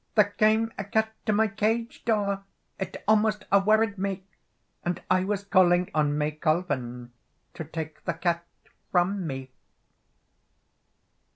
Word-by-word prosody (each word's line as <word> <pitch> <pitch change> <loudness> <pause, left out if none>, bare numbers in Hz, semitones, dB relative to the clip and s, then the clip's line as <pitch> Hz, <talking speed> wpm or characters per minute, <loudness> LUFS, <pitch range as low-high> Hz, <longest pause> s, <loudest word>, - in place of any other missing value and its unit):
"There 210 -2 +4
came 220 +1 +3
a - - -1
cat 220 +2 0
to - - +4
my 220 +1 +3
cage 220 +2 -1
door, 200 -3 +1 0.4
It 190 -1 -5
almost 215 0 +3
a 200 - +7
worried 215 0 +2
me, 195 -1 -2 0.6
And 175 0 -1
I 185 0 +4
was 200 +1 -2
calling 180 -2 +3
on 150 -1 +1
May 150 0 0
Colven 145 -7 -2 0.4
To 160 - -6
take 160 0 -7
the 170 - -1
cat 170 0 0 0.5
from 180 0 +1
me." 130 -2 -6
195 Hz, 135 wpm, -27 LUFS, 165-215 Hz, 0.6 s, a